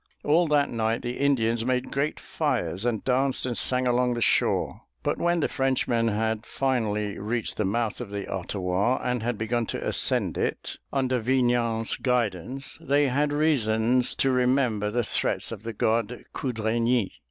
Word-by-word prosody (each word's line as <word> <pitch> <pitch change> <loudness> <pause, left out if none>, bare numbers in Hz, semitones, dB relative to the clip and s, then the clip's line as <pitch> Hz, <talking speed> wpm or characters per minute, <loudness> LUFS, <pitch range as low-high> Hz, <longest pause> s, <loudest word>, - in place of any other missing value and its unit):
All 165 +3 +3
that 145 -2 +2
night 115 0 -1
the 120 0 -4
Indians 115 -5 +2
made 125 +1 -1
great 140 +2 -1
fires 95 +6 -2
and 115 -4 0
danced 130 +1 +1
and 125 -2 -2
sang 125 +2 +2
along 125 0 +2
the - - -2
shore. - - +1 0.2
But - - -1
when 175 -1 +1
the - - +2
Frenchmen 130 -3 0
had 110 0 -1
finally 110 -7 -1
reached 110 +2 -3
the - - 0
mouth 115 +3 -1
of 120 - -6
the 100 -1 -4
Ottawa 95 +5 -1
and 125 -1 -1
had 120 0 -2
begun 115 +1 -1
to - - -4
ascend - - +1
it, - - -3
under 130 -2 +1
Vignan's 120 -2 +1
guidance, 125 +1 -2
they 145 0 +2
had 145 +3 +1
reasons 125 -5 +2
to 135 - +2
remember 125 -4 +2
the 120 +3 0
threats - - -1
of 110 -3 -6
the 115 +1 -5
god 115 +2 0
Cudraigny. 115 -2 0
120 Hz, 165 wpm, -26 LUFS, 110-130 Hz, 0.2 s, All